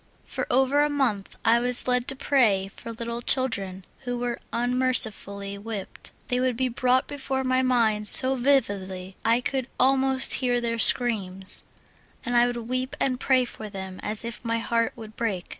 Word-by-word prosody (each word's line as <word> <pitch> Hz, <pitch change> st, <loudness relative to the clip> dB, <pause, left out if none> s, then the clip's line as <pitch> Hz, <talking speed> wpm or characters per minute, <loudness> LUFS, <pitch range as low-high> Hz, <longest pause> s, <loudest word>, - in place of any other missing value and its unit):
For -, -, -5 dB
over 265 Hz, +3 st, +2 dB
a 295 Hz, -, +2 dB
month 250 Hz, -9 st, -1 dB
I 230 Hz, +1 st, +4 dB
was 245 Hz, +1 st, +2 dB
led 250 Hz, -1 st, +1 dB
to 270 Hz, -, -3 dB
prayer 220 Hz, -9 st, +1 dB
for 230 Hz, -, -9 dB
little 235 Hz, +1 st, -5 dB
children 200 Hz, -8 st, 0 dB
who 245 Hz, -2 st, -4 dB
were 240 Hz, -1 st, -3 dB
unmercifully 230 Hz, -5 st, +1 dB
whipped; 210 Hz, -2 st, -7 dB, 0.2 s
they 250 Hz, -, -1 dB
would 255 Hz, -2 st, 0 dB
be 260 Hz, 0 st, 0 dB
brought 255 Hz, +2 st, +1 dB
before 270 Hz, -2 st, -3 dB
my 255 Hz, 0 st, +1 dB
mind 225 Hz, -5 st, +1 dB
so 260 Hz, +5 st, +5 dB
vividly 200 Hz, -8 st, -1 dB
I 230 Hz, +2 st, +2 dB
could 265 Hz, -1 st, -2 dB
almost 265 Hz, 0 st, +3 dB
hear 245 Hz, -1 st, +1 dB
their 230 Hz, -1 st, -2 dB
screams, 195 Hz, -7 st, +2 dB, 0.6 s
and 245 Hz, 0 st, -2 dB
I 240 Hz, 0 st, +5 dB
would 245 Hz, 0 st, -3 dB
weep 255 Hz, +3 st, -3 dB
and 255 Hz, -2 st, 0 dB
pray 260 Hz, -2 st, +2 dB
for 220 Hz, -3 st, -9 dB
them 190 Hz, -2 st, -8 dB
as 215 Hz, +2 st, -2 dB
if 235 Hz, 0 st, -7 dB
my 230 Hz, -1 st, -1 dB
heart 230 Hz, 0 st, -1 dB
would 220 Hz, -2 st, -11 dB
break. 205 Hz, -6 st, -3 dB
240 Hz, 175 wpm, -25 LUFS, 215-255 Hz, 0.6 s, so